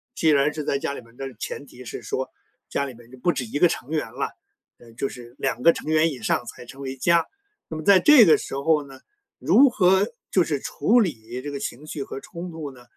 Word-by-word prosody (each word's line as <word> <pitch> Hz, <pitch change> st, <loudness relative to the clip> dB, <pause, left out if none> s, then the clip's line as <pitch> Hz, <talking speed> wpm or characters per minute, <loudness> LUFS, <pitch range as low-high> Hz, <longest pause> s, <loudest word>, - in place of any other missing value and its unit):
既 160 Hz, -, +2 dB
然 145 Hz, 0 st, +3 dB
是 155 Hz, -, -4 dB
在 140 Hz, -1 st, 0 dB
家 140 Hz, -, -2 dB
里 -, -, -7 dB
面 115 Hz, 0 st, -20 dB
但 135 Hz, -, -5 dB
是 130 Hz, -, -11 dB
前 140 Hz, -, -6 dB
提 125 Hz, -2 st, -13 dB
是 120 Hz, -, -7 dB
说， 130 Hz, -, -3 dB, 0.4 s
家 140 Hz, -, -1 dB
里 135 Hz, -, -7 dB
面 120 Hz, 0 st, -17 dB
就 130 Hz, -, -12 dB
不 175 Hz, +7 st, +1 dB
止 130 Hz, -, -3 dB
1 130 Hz, +6 st, -4 dB
个 175 Hz, -, +7 dB
成 140 Hz, -, -5 dB
员 155 Hz, -1 st, -2 dB
了， -, -, -3 dB, 0.5 s
呃， 120 Hz, -1 st, -16 dB
就 135 Hz, -, -2 dB
是 120 Hz, -2 st, -11 dB
2 130 Hz, -3 st, -2 dB
个 170 Hz, -, +7 dB
成 155 Hz, -, -6 dB
员 160 Hz, +1 st, +4 dB
以 135 Hz, -, -7 dB
上 115 Hz, -, 0 dB
才 120 Hz, -, -10 dB
成 135 Hz, +3 st, -12 dB
为 135 Hz, -1 st, -5 dB
家， 170 Hz, +4 st, +3 dB, 0.4 s
那 160 Hz, -, -5 dB
么 155 Hz, -, -6 dB
在 195 Hz, +2 st, +7 dB
这 270 Hz, +2 st, +8 dB
个 160 Hz, -, +6 dB
时 -, -, -6 dB
候 150 Hz, +1 st, +2 dB
呢， 135 Hz, -1 st, -13 dB, 0.4 s
如 275 Hz, 0 st, +5 dB
何 190 Hz, +2 st, +3 dB, 0.2 s
就 185 Hz, -, +4 dB
是 150 Hz, -4 st, -2 dB
处 210 Hz, -, +2 dB
理 125 Hz, -, -2 dB
这 145 Hz, +2 st, -6 dB
个 140 Hz, -, -5 dB
情 135 Hz, +3 st, -6 dB
绪 150 Hz, -2 st, -4 dB
和 135 Hz, -, -7 dB
冲 175 Hz, +4 st, -8 dB
突 155 Hz, -3 st, -6 dB
呢？ 125 Hz, -1 st, -16 dB
140 Hz, 265 characters per minute, -24 LUFS, 130-165 Hz, 0.5 s, 这